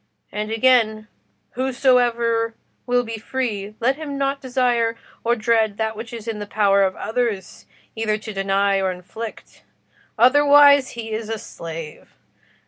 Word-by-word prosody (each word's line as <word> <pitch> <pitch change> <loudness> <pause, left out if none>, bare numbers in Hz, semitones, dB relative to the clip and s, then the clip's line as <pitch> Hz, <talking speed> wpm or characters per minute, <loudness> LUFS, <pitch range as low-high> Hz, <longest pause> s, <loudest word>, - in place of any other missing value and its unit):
And 210 +1 -4
again, 225 -2 +2 0.4
'whosoever 240 -3 +1 0.3
will 245 0 +2
be 225 -1 -6
free, 215 -4 -3
let 260 +4 +1
him 295 -3 -5
not 275 0 -1
desire 245 -3 +1 0.3
or 235 +1 +2
dread 220 -2 +1
that 220 0 -2
which 225 +1 -8
it - - -6
is 230 -1 -9
in 220 -2 -3
the 205 - -6
power 200 -1 +3
of 190 -1 +1
others 225 -5 -3 0.3
either 220 -1 0
to 215 0 -8
deny 195 0 +1
or 190 -1 0
inflict: 195 +5 -9 0.6
otherwise, 285 +2 +6
he 225 -1 -6
is 220 0 -4
a 225 - -2
slave. 165 -7 -9
225 Hz, 145 wpm, -21 LUFS, 210-245 Hz, 0.6 s, otherwise